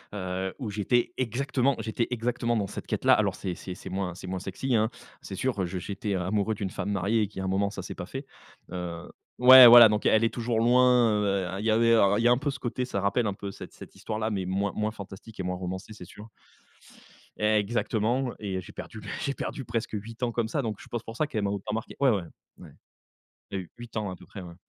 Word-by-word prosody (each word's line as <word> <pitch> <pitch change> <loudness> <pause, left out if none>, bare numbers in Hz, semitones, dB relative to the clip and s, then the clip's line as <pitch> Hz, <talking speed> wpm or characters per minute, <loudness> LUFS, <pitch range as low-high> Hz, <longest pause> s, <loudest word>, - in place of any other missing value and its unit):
Heu, 95 0 -3
où 115 -6 -5
j'étais 110 +4 0
exactement 130 +2 0
j'étais 115 +1 -2
exactement 120 0 -1
dans 100 - -1
cette - - -8
quête-là. - - +3
Alors, - - +2
c'est 90 -2 -4
c'est 90 +2 -7
c'est - - -9
moins 95 -2 -3
c'est 95 - -9
moins 95 0 -3
sexy, 100 +7 -2
hein, 110 0 +2 0.3
c'est 95 - -7
sûr. 120 -1 -1
Heu, - - +1
je 90 +2 -5
j'étais 100 +2 -3
amoureux 100 +4 0
d'une 100 -2 -4
femme 100 - -4
mariée, 100 +3 +1
et 105 - -1
qu'il 105 - -9
y - - -2
a - - -3
un - - -1
moment, 100 +1 +1
ça 100 - -7
s'est - - -7
pas - - -6
fait. 135 +4 -6 0.5
Heu, 90 -1 -5 0.3
ouais, 130 0 +11
voilà. 120 -1 +11
Donc 105 0 -1
elle 110 +1 +4
est 115 - +1
toujours 115 -1 -1
loin, 125 -1 +5
heu, 100 -2 0
il 105 - -4
y - - +2
avait 115 +1 +4 0.3
il - - 0
y 120 - +5
a - - +5
un 120 - +4
peu 145 +1 -1
ce - - -7
côté 125 +1 -2
ça 100 - -3
rappelle 100 +3 +1
un 100 - -1
peu 100 0 -6
cette - - -11
cette - - -12
histoire 110 - -5
là, 110 +1 -1
mais 95 -3 -2
moins 100 +2 -1
moins 110 0 -1
fantastique, 100 +1 -11
et 95 - -2
moins 90 0 -2
romancée, 95 +4 -6
c'est 90 - -11
sûr. 105 +5 -13 1.1
Exactement, 110 +3 0
et 95 -3 -3
j'ai 90 - -13
perdu 110 - -8 0.2
j'ai 140 - -1
perdu 135 - -5
presque 115 -1 -3
8 110 +3 -6
ans 120 -1 0
comme 115 -1 -1
ça. 145 - -1
Donc 110 -5 -4
je - - -13
pense 120 - -3
pour 115 - -9
ça 155 - 0
qu'elle 110 -8 -2
m'a 100 - 0
autant 100 +1 -4
marqué. 110 +1 -5
Ouais 140 -1 +4
ouais 100 -6 +1 0.3
ouais. - - -13 0.8
Il 100 - -3
y - - -2
a - - -7
eu - - -20
8 120 -1 -10
ans 105 -3 -2
à 90 - -7
peu - - -16
près, 100 - -9
ouais. 85 -2 -10
105 Hz, 260 wpm, -27 LUFS, 95-120 Hz, 1.1 s, ouais